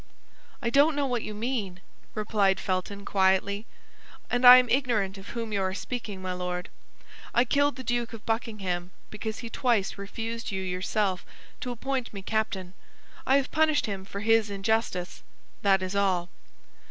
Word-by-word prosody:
"I 235 - 0
don't 285 +4 +5
know 290 -1 +1
what 245 -3 -1
you 215 - -6
mean," 210 -5 -3 0.4
replied 210 -2 +2
Felton, 200 +1 -3
quietly, 200 +2 +2 0.6
"and 245 +1 +2
I 250 0 +13
am 250 -1 +4
ignorant 225 -7 +1
of 195 - -12
whom 230 -2 -4
you 200 - +1
are 190 0 -1
speaking, 210 -5 -5
my 185 0 -2
Lord. 180 0 -4 0.7
I 240 - +5
killed 285 +2 +2
the 260 - -7
Duke 240 -1 -1
of 230 -2 -10
Buckingham 200 -6 -2 0.2
because 220 +1 -4
he - - -5
twice 225 -6 +1
refused 225 +3 -5
you 190 -1 -2
yourself 185 +1 -1 0.4
to 250 - -4
appoint 255 -1 -3
me 195 - -6
captain; 195 -4 -2 0.5
I 270 - +6
have 275 -1 -1
punished 310 -1 +3
him 200 -4 -4
for 200 +1 -7
his 225 -1 +3
injustice, 200 -2 -1 0.4
that 195 -2 +3
is 185 +2 -3
all." 185 -3 +1
215 Hz, 165 wpm, -28 LUFS, 190-240 Hz, 0.7 s, I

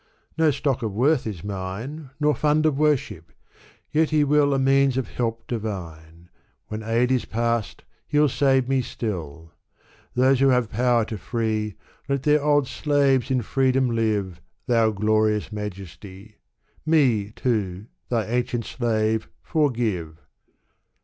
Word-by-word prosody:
No 160 -1 +3
stock 135 -2 -1
of 110 -4 -3
worth 130 +4 +2
is 95 -6 -6
mine. 105 +10 -6
Nor 150 0 +3
fund 150 +3 +1
of 155 -3 +2
worship, 135 - 0 0.6
yet 155 +1 +2
He 155 -1 +3
will 145 0 +3
A 135 - +2
means 135 0 +3
of 130 - -2
help 115 -1 -3
divine; 85 -7 -6 0.4
When 110 +1 -4
aid 115 +3 +1
is 130 -2 +1
past, 115 -1 -2 0.2
He'll 150 0 +3
save 135 -1 +2
me 135 -1 +2
stilL 80 - -6 0.6
Those 130 +1 +4
who 135 - +4
have 125 -4 +2
power 120 0 +2
to 110 -1 -6
free, 110 -1 -2 0.3
Let 140 -1 0
their 150 0 +3
old 145 -2 +3
slaves 140 -3 +1
in 130 -2 +1
freedom 130 +1 +1
live, 105 -6 -1 0.2
Thou 115 -2 +3
Glorious 110 0 +1
Majesty! 100 0 -8 0.5
Me, 130 -10 +2
too, 105 -5 -2 0.2
Thy 115 -4 0
ancient 120 0 -1
slave, 110 -2 -1
forgive. 115 - -1
120 Hz, 135 wpm, -24 LUFS, 105-135 Hz, 0.6 s, Those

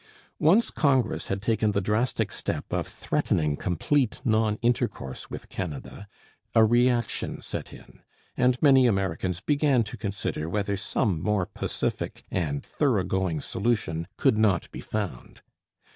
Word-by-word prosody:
Once 190 +10 +4
Congress 130 -6 +1
had 95 +1 -3
taken 110 -1 +1
the 100 - +2
drastic 105 +6 0
step - - -3
of - - -1
threatening 75 -2 0
complete 110 - 0
non 110 -2 +2
intercourse 115 - -1
With - - -7
Canada, 90 +3 -6 0.5
a 110 -1 +7
reaction 120 0 +1
set - - -6
in, - - -15 0.3
and 125 0 +2
many 135 -3 +7
Americans 95 -3 -1
began 145 -2 +2
to 105 - -8
consider 100 -6 -3
whether 100 +2 -1
some 95 -2 0
more 105 -2 +1
pacific - - -3
and 75 -6 -2
thoroughgoing 95 - 0
solution 95 -6 -1
could 110 - +3
not 100 -6 +2
be - - -7
found. 100 - -5
105 Hz, 130 wpm, -26 LUFS, 90-120 Hz, 0.5 s, a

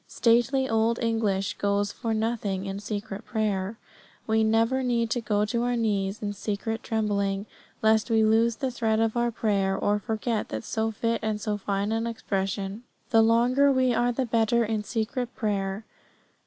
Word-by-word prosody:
Stately 240 +3 +2
old 225 0 +2
English 225 -3 -1
goes 200 0 +1
for 230 -2 -4
nothing 215 -3 -1
in 195 0 -4
secret 205 0 -5
prayer. 210 -1 -2 0.5
We 220 0 +2
never 225 +4 +2
need 235 -3 0
to 245 - 0
go 210 -1 +1
to 235 +2 -1
our 245 0 0
knees 210 -3 -1
in 205 0 -2
secret 215 +2 -3
trembling, 200 -2 -1 0.4
lest 220 +1 +3
we 225 -1 +4
lose 225 +1 +3
the 265 0 -2
thread 225 -2 0
of 225 0 +1
our 240 0 +2
prayer, 200 -4 0
or 205 +1 +1
forget 220 +1 -2
that 110 - -4
so 220 0 -1
fit 230 +1 -1
and 215 -1 -1
so 210 0 -2
fine 200 0 -2 0.2
expression. 195 -2 -3 0.3
The 225 -1 +6
longer 245 +5 +4
we 260 -2 +2
are 240 +1 +2
the 255 +2 -1
better 230 0 +2
in 215 -1 -2
secret 235 +3 -3
prayer. 200 -2 -2
220 Hz, 170 wpm, -26 LUFS, 205-235 Hz, 0.5 s, The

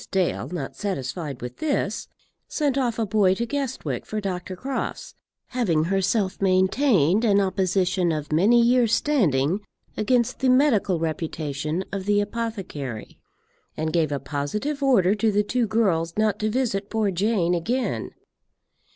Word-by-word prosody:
Dale, 190 -2 0
not 175 - -5
satisfied 145 - -4
with 125 0 -7
this, 305 -3 -1 0.4
sent 290 -4 0
off 245 -4 0
a 225 - 0
boy 200 -2 +3
to 235 - -2
Guestwick 270 0 -3
for 215 - -3
Dr. 185 -2 -4
Crofts, 265 +7 -4 0.4
having 185 -11 +1
herself 195 +2 0
maintained 190 - +3
an 205 -3 +4
opposition 185 -2 +1
of 150 -1 -4
many 205 +10 +5
years' 235 -1 +4
standing 180 - +1 0.4
against 235 +2 +1
the 265 - +2
medical 255 - +3
reputation 155 0 -3
of 195 -1 -4
the 205 0 +3
apothecary, 200 - -5 0.6
and 155 0 -2
gave 160 -3 +1
a 140 - -1
positive 155 - -3
order 230 -9 +4
to 215 +1 +1
the 205 +1 +2
two 240 +2 0
girls 185 -7 0
not 215 -2 +1
to 215 - 0
visit 215 -4 -1
poor 220 -3 0
Jane 185 -2 +1
again. 235 +10 -1
200 Hz, 140 wpm, -24 LUFS, 170-230 Hz, 0.6 s, many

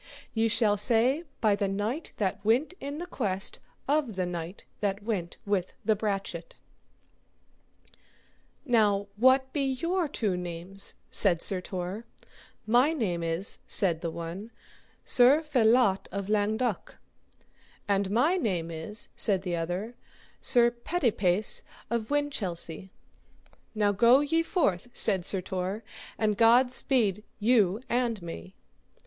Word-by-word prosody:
Ye 225 0 +1
shall 215 -2 +2
say 245 - +2 0.2
by 215 -2 +3
the 200 0 -1
knight 210 +10 -3
that 200 -1 -2
went 245 - +1
in 280 +1 -6
the 345 - -5
quest 195 - -1 0.3
of 280 -6 0
the 185 -1 -1
knight 175 +1 -6
that 200 0 -2
went 195 -6 -3
with 200 -3 -1
the 220 - +3
brachet. 210 - -4 2.1
Now, 205 -5 +2
what 260 +4 +3
be 290 - 0
your 335 +7 -1
two 215 -9 -2
names? 180 +2 -5 0.2
said 175 -5 +3
Sir 185 +1 +4
Tor. 185 +5 -5 0.6
My 245 +8 +3
name 190 - -2
is, 165 +4 -2
said 170 -5 +4
the 170 - -2
one, 170 +6 -7 0.6
Sir 265 +6 +5
Felot 240 -7 +2
of 200 +1 -4
Langduk; 215 +1 -1 0.9
and 200 -1 +1
my 270 - +2
name 180 - -2
is, 165 +7 -2
said 195 -3 +3
the 180 -2 -2
other, 175 +7 -4 0.5
Sir 240 -1 +4
Petipase 230 - +1 0.3
of 230 -2 -2
Winchelsea. 195 - -3 0.9
Now 205 -1 +2
go 235 +6 +5
ye 325 +3 +1
forth, 270 - 0
said 190 -2 +4
Sir 190 +2 0
Tor, 185 +4 -4 0.3
and 210 -2 0
God 240 +2 +5
speed 220 -7 +1
you 210 -3 +2
and 240 -3 -1
me. 90 - -9
210 Hz, 130 wpm, -28 LUFS, 190-245 Hz, 2.1 s, Sir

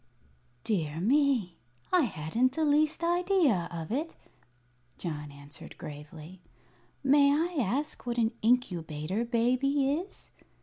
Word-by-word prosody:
"Dear 160 -7 -1
me, 240 - +2 0.4
I 355 -5 +5
hadn't 225 +7 0
the 315 +2 0
least 305 +2 +2
idea 345 - +2
of 165 0 -6
it," 305 +7 -2 0.8
John 150 -4 -5
answered 140 +1 -11
gravely. 155 +4 -10 0.6
"May 280 +1 +5
I 330 +4 0
ask 255 +5 -2
what 240 0 -2
an 225 -1 +2
Incubator 185 -5 0
Baby 255 +4 +1
is?" 345 +7 -5
240 Hz, 115 wpm, -29 LUFS, -, 0.8 s, I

